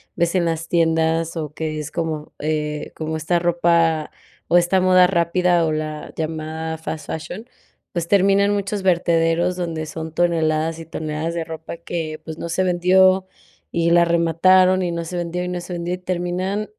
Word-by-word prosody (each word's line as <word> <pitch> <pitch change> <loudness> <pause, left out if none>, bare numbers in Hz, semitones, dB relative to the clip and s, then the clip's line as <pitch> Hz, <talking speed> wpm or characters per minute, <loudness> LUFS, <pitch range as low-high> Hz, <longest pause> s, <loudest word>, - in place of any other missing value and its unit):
ves 170 0 +1
en 180 -2 +2
las 165 -1 -2
tiendas 165 0 +1
o 155 -3 -4
que 155 -1 -3
es 150 0 -6
como 160 -3 -3
eh, 150 0 -3
como 160 0 -3
esta 160 +3 0
ropa, 170 -2 +2 0.4
o 175 - +5
esta 175 +2 +3
moda 185 -1 +5
rápida, 175 -1 +2
o 155 - 0
la 155 0 -5
llamada 160 0 -4
fast 160 -1 -6
fashion, 180 +7 -6 0.5
pues 170 -1 -3
termina 200 +1 +4
en 205 - +1
muchos 200 0 -2
vertederos 170 0 +2
donde 165 -3 -3
son 160 0 -6
toneladas 160 -2 +1
y 165 - -8
toneladas 155 +1 -4
de 170 -1 -2
ropa 160 0 -7
que, 165 -2 -5
pues 160 -1 -7
no 170 - -5
se 175 +3 0
vendió, 185 +1 +4 0.5
y 170 0 +2
la 170 0 +5
remataron 185 +3 +4
y 175 - -1
no 170 0 -3
se 175 +2 -5
vendió, 175 +1 -3
y 180 - -3
no 180 - -3
se 175 +1 -7
vendió 175 0 -3
y - - -10
terminan, 185 +3 -2
170 Hz, 180 wpm, -21 LUFS, 160-180 Hz, 0.5 s, o